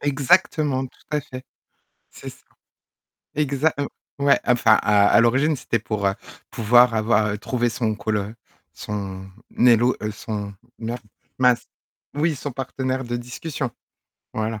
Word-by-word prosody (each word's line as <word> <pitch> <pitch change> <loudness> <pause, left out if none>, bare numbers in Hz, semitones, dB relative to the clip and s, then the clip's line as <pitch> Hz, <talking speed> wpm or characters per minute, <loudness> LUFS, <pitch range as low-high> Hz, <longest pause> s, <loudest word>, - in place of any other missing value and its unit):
Exactement, 145 -1 +2
tout - - -22
à 150 -1 0
fait, 130 -1 -9 0.7
c'est - - -9
ça. - - -16 0.9
Exa 150 +1 +1
heu, 140 - 0 0.3
ouais 140 0 +4
enfin 120 -3 +4
à 105 -1 +4
à 115 - +5
l'origine, 135 +6 +3
c'était 115 -3 -2
pour, 105 -2 -3
heu, 95 - +1 0.4
pouvoir 120 +2 +5
avoir 105 -1 +1
trouver 120 0 -1
son 110 -1 -1
coll 105 +1 -1
heu 105 +3 -5 0.4
son 95 -2 -6 0.3
élo 120 0 +5
heu, 105 0 -2
son, 105 -2 -5 0.2
mer 115 +1 -4 0.4
mince, 125 -2 +3 0.5
oui, 155 +1 0
son 145 +1 -5
partenaire 130 0 -3
de 120 0 -2
discussion, 125 +2 -5 0.6
voilà. 110 0 -2
120 Hz, 140 wpm, -22 LUFS, 110-135 Hz, 0.9 s, à